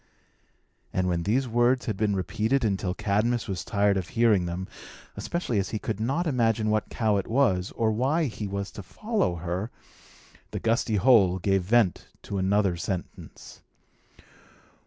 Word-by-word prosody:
And 90 Hz, 0 st, 0 dB
when 85 Hz, -2 st, 0 dB
these 130 Hz, +4 st, +2 dB
words 120 Hz, +2 st, +2 dB
had 110 Hz, -, -2 dB
been 105 Hz, 0 st, 0 dB
repeated 110 Hz, +7 st, 0 dB
until 95 Hz, -3 st, -1 dB
Cadmus 110 Hz, +5 st, 0 dB
was 95 Hz, -4 st, -3 dB
tired 100 Hz, -1 st, +1 dB
of 90 Hz, -2 st, -3 dB
hearing 105 Hz, -7 st, +2 dB
them 90 Hz, +2 st, -4 dB, 0.5 s
(especially 170 Hz, -, -2 dB
as 95 Hz, -, -2 dB
he 110 Hz, -, -2 dB
could 105 Hz, -1 st, -4 dB
not 135 Hz, +10 st, 0 dB
imagine 115 Hz, -6 st, +1 dB
what 110 Hz, -1 st, 0 dB
cow 110 Hz, -3 st, +1 dB
it 100 Hz, -, -3 dB
was, 110 Hz, -7 st, +1 dB
or 110 Hz, -1 st, +1 dB
why 135 Hz, +9 st, +1 dB
he 110 Hz, -6 st, -3 dB
was 100 Hz, 0 st, -4 dB
to 105 Hz, -, -8 dB
follow 185 Hz, -, -1 dB
her), 90 Hz, +5 st, -3 dB, 0.8 s
the -, -, -4 dB
gusty 115 Hz, -1 st, +1 dB
hole 100 Hz, -4 st, +5 dB
gave 95 Hz, +1 st, +1 dB
vent 100 Hz, -1 st, +2 dB, 0.2 s
to 100 Hz, -, -4 dB
another 95 Hz, -1 st, +2 dB
sentence. 90 Hz, +1 st, -7 dB
105 Hz, 155 wpm, -26 LUFS, 95-120 Hz, 0.8 s, hole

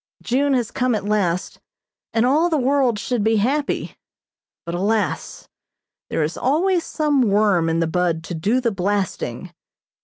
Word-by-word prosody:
June 275 Hz, +3 st, +1 dB
has 240 Hz, -3 st, -1 dB
come 250 Hz, -2 st, 0 dB
at 205 Hz, -, -3 dB
last, 190 Hz, -4 st, -1 dB, 0.5 s
and 225 Hz, +1 st, +2 dB
all 305 Hz, +7 st, +3 dB
the 320 Hz, -, +1 dB
world 265 Hz, -3 st, +2 dB
should 235 Hz, 0 st, -2 dB
be 225 Hz, +1 st, +2 dB
happy, 275 Hz, +8 st, -1 dB, 0.7 s
but, 170 Hz, -, -5 dB
alas, 205 Hz, +4 st, -1 dB, 0.6 s
there 160 Hz, -, 0 dB
is 155 Hz, +3 st, -3 dB
always 340 Hz, +6 st, +1 dB
some 300 Hz, -3 st, +1 dB
worm 200 Hz, -6 st, +2 dB
in 165 Hz, +1 st, 0 dB
the -, -, +2 dB
bud 170 Hz, -1 st, 0 dB
to 175 Hz, -, -6 dB
do 200 Hz, +10 st, +1 dB
the 240 Hz, -2 st, 0 dB
blasting. 195 Hz, -1 st, -2 dB
220 Hz, 155 wpm, -21 LUFS, 185-265 Hz, 0.7 s, all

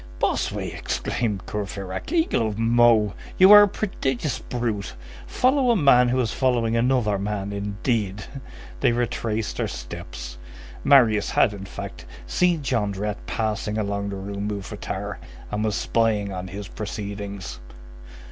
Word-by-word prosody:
"Bossuet!" -, -, -1 dB
exclaimed 105 Hz, -5 st, -2 dB
Courfeyrac, 100 Hz, -, -5 dB
"eagle 325 Hz, -, +2 dB
of 105 Hz, -1 st, -4 dB
Meaux! 115 Hz, -2 st, +4 dB, 0.2 s
You 190 Hz, +2 st, +8 dB
are 210 Hz, 0 st, +12 dB
a 205 Hz, -, +6 dB
prodigious 150 Hz, -, -2 dB
brute. 110 Hz, -, -3 dB, 0.3 s
Follow 260 Hz, 0 st, +2 dB
a 235 Hz, -, +5 dB
man 130 Hz, -, +5 dB
who 130 Hz, +1 st, +1 dB
is 115 Hz, -2 st, -1 dB
following 120 Hz, -3 st, +1 dB
another 115 Hz, -4 st, +2 dB
man, 100 Hz, 0 st, -3 dB
indeed!" 100 Hz, 0 st, -2 dB, 0.6 s
They 120 Hz, -, +3 dB
retraced 115 Hz, -2 st, -2 dB
their -, -, 0 dB
steps. -, -, -8 dB, 0.4 s
Marius 115 Hz, -7 st, +5 dB
had, -, -, +3 dB
in 100 Hz, -1 st, -7 dB
fact, -, -, -8 dB, 0.2 s
seen 175 Hz, -4 st, +1 dB
Jondrette 105 Hz, -4 st, -2 dB
passing 110 Hz, -1 st, -2 dB
along 100 Hz, -1 st, -2 dB
the 100 Hz, -, -4 dB
Rue 100 Hz, +1 st, -5 dB
Mouffetard, 100 Hz, -2 st, -4 dB, 0.3 s
and 105 Hz, +1 st, -1 dB
was 110 Hz, -2 st, 0 dB
spying 105 Hz, -3 st, +1 dB
on 90 Hz, 0 st, -5 dB
his 100 Hz, +1 st, -7 dB
proceedings. 100 Hz, -, -6 dB
105 Hz, 135 wpm, -24 LUFS, 100-120 Hz, 0.6 s, are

